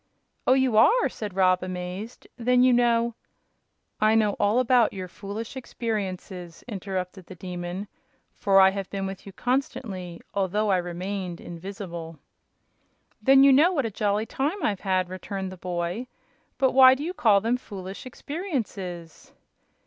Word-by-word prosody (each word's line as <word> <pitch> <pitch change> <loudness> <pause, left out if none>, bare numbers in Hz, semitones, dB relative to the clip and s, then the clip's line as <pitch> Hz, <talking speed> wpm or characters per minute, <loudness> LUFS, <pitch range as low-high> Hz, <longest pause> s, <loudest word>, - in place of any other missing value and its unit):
"Oh, 255 - +7
you 260 -4 +2
are!" 365 - +5
said 205 -4 -7
Rob, 185 -1 +3
amazed. 185 +5 -6
"Then 250 +1 +3
you 255 -1 +5
know 235 -1 +3 0.4
" - - -42
"I 215 +1 +4
know 215 -2 +3
all 205 +3 +3
about 250 -2 +4
your 185 -1 -5
foolish 205 +6 -7
experiences," 190 -8 -5
interrupted 190 -3 -5
the 185 - -10
Demon, 180 +2 -5 0.5
"for 195 -3 +3
I 190 0 +7
have 195 -1 -5
been 195 -1 -3
with 195 +1 -7
you - - -7
constantly, 200 -8 -3
although 200 +2 +1
I 190 - +4
remained 180 0 -4
invisible." 170 -2 -7 1.0
"Then 270 0 +6
you 275 -1 +7
know 310 +7 +6
what 280 -7 0
a 225 - -2
jolly 205 +1 0
time 300 - -2
I've 200 -5 0
had," 185 -2 0
returned 190 +1 -5
the 185 - -9
boy. 180 +6 -3 0.5
"But 265 -1 +3
why 260 0 +8
do 280 - -6
you 350 +3 -3
call 215 - +4
them 230 +4 0
foolish 195 -2 -8
experiences?" 220 - -5
200 Hz, 155 wpm, -26 LUFS, 185-245 Hz, 1.0 s, why